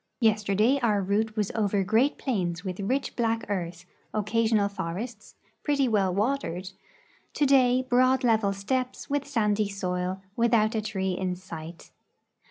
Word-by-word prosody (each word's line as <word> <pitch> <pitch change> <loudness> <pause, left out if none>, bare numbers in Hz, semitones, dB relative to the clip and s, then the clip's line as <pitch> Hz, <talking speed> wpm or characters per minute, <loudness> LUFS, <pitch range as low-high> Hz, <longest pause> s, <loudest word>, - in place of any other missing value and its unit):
"Yesterday 215 +3 +3
our 220 -5 +2
route 210 +3 0
was 210 -3 -1
over 205 -2 +1
great 225 +8 +2
plains 180 - -2
with 185 0 -4
rich 255 +8 -1
black 230 -1 0
earth, 175 -3 -3 0.3
occasional 215 0 +2
forests, 200 +4 -6 0.3
i)retty 280 -3 +2
well 200 -5 +2
watered; 200 -4 -1 0.6
today, 260 -3 +4
broad 255 +1 +3
level 220 -4 +3
stej^pes 255 +8 -3
with 285 -1 0
sandy 210 -6 +1
soil, 185 -1 -2 0.2
without 230 -1 +3
a 220 - 0
tree 195 -3 -2
in 180 0 -2
sight. 170 -2 -10
215 Hz, 135 wpm, -27 LUFS, 190-245 Hz, 0.6 s, today